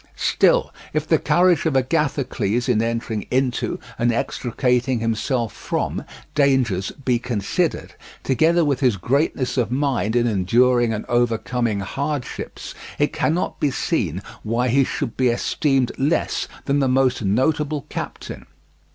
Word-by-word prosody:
Still, - - +2 0.2
if - - -1
the - - +3
courage 175 -1 +3
of 150 - 0
Agathocles 130 -5 0
in 115 -4 +2
entering 115 -2 -2
into 130 -1 0 0.2
and 120 0 +3
extricating 125 +1 0
himself 115 +1 -1
from - - -3 0.3
dangers 130 -10 +2
be 125 -2 +2
considered, 115 -5 -2 0.3
together 160 +5 +3
with 140 -3 +1
his 125 -7 +2
greatness 135 - 0
of 115 -3 0
mind 125 -6 0
in 120 -1 +3
enduring 120 +4 +3
and 110 -1 -3
overcoming 120 -2 0
hardships, 140 +6 -4 0.2
it - - +1
cannot 165 +4 -1
be 145 - +2
seen 100 - -1 0.2
why 120 +3 0
he 135 +3 +4
should 130 -2 -3
be 130 - +2
esteemed 130 +2 +1
less 145 +5 0 0.2
than 140 0 +1
the 135 - +2
most 130 -1 +2
notable 140 +7 0
captain. - - -7
125 Hz, 135 wpm, -22 LUFS, 115-140 Hz, 0.3 s, he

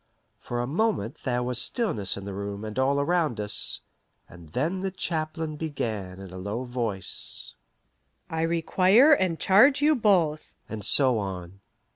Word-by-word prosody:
For 120 0 -4
a - - -1
moment 155 - -1
there 125 -2 0
was 125 -1 +1
stillness 115 - -1
in 100 - -7
the 100 - -6
room 100 +1 -5
and 110 +3 -5
all 140 +2 +2
around 155 -6 0
us, 105 -1 -2 0.5
and 85 -2 -14
then 155 - -1
the 190 +1 -2
chaplain 160 -3 -3
began 110 - -4
in 95 -2 -10
a 95 - -7
low 105 +6 -4
voice: 120 -6 -3 0.7
"I 160 0 -3
require 185 - +4
and 185 - +1
charge 245 +9 +5
you 300 +2 +4
both 180 - +1
" - - -44
and 110 -2 -6
so 130 +1 +4
on. 95 -2 -6
130 Hz, 160 wpm, -26 LUFS, -, 0.7 s, charge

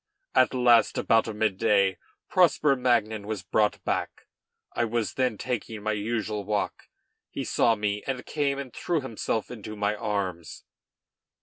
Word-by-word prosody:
At - - +4
last, 120 -2 +4
about 115 0 +3
mid 105 -3 0
day, 100 -5 +3 0.3
Prosper 160 -6 +4
Magnan 110 -5 +1
was 105 -4 -4
brought 105 +3 +1
back. - - -2 0.5
I 120 - 0
was 115 -1 -1
then 125 -5 0
taking 115 -3 -4
my 110 - 0
usual 110 0 -2
walk; 105 +1 -3 0.4
he - - -4
saw 115 - +2
me, 105 -1 -1
and 130 -2 -3
came 140 -2 -1
and 140 -3 -6
threw 170 -4 -1
himself 115 -3 -3
into 110 -2 -7
my 105 0 0
arms. 95 -6 -3
110 Hz, 145 wpm, -27 LUFS, 105-125 Hz, 0.5 s, At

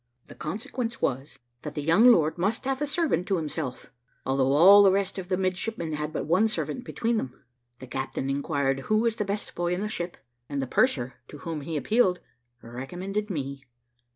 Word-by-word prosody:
The - - -9
consequence 225 +7 -4
was, 135 +4 -2 0.2
that 150 -1 -7
the 150 - -3
young 165 +10 +5
lord 160 -8 +3
must 205 +8 -1
have 270 +1 -1
a 295 - 0
servant 285 - 0
to 195 - +2
himself, 150 -5 -4 0.3
although 135 0 +2
all 190 +7 +9
the 195 -1 +6
rest 195 0 0
of 180 -1 -7
the 185 - +1
midshipmen 185 -2 -2
had 150 0 -3
but 155 - -3
one 180 +8 +3
servant 245 +3 -3
between 230 0 -1
them. 130 - -5 0.3
The 130 - -10
captain 130 +1 -4
inquired 140 -1 0
who 215 - +4
was 230 0 +1
the 210 - -1
best 200 +1 -4
boy 175 0 -1
in 185 - -4
the 210 - -1
ship, 175 -4 -4 0.3
and 140 -1 -2
the 135 - -1
purser, 130 - +1
to 150 - -10
whom 160 +1 -5
he 155 +2 -3
appealed, 185 - +2 0.4
recommended 180 - -4
me. 140 -5 -4
175 Hz, 195 wpm, -27 LUFS, 140-210 Hz, 0.4 s, all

